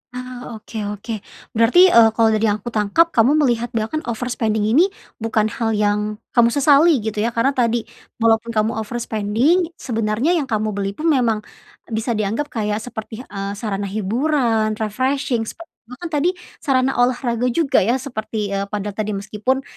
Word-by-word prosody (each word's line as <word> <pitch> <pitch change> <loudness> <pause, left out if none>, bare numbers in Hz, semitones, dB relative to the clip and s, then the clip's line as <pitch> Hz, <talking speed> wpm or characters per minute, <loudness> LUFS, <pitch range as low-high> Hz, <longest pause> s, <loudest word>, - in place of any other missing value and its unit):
Ah, 250 -1 -7
oke, 220 +1 -10 0.2
oke. 220 +2 -5 0.3
Berarti, 250 +12 +5
eee, 230 -1 +7
kalau 225 -1 +4
dari 220 +1 +2
yang 205 - +2
aku 240 - -5
tangkap 225 +11 +2
kamu 240 +6 +4
melihat 240 -2 +1
bahkan 225 +8 -1
overspending 225 -2 -1
ini 270 - +4 0.3
bukan 220 -1 0
hal 225 -1 -1
yang 210 0 0 0.2
kamu 235 -1 +5
sesali 285 +1 +4
gitu, 215 -1 -3
ya. 230 +2 -1
Karena 235 +4 +3
tadi, 235 -3 +1 0.3
walaupun 230 0 +2
kamu 215 +1 +2
overspending, 235 - 0
sebenernya 225 +5 -1
yang 320 -6 +1
kamu 215 -3 -1
beli 200 -1 -3
pun 320 +1 +1
memang 230 -6 +1 0.5
bisa 225 +2 -1
dianggap 215 +7 -1
kayak 210 -4 -2
seperti, 220 -1 -7
eee, 200 0 -5
sarana 200 -3 -3
hiburan, 220 +1 0
refreshing, 250 +2 -1
sepe 335 +9 -9 0.2
bahkan 325 +7 -8
tadi 355 +5 +1 0.2
sarana 265 -3 +1
olahraga 245 -1 +1
juga 275 +2 +2
ya, 230 +6 +2
seperti, 220 -5 -4
eee, 200 0 -2
padel 210 0 -3
tadi 215 0 -2
meskipun 215 +6 -2
230 Hz, 160 wpm, -20 LUFS, 215-255 Hz, 0.5 s, eee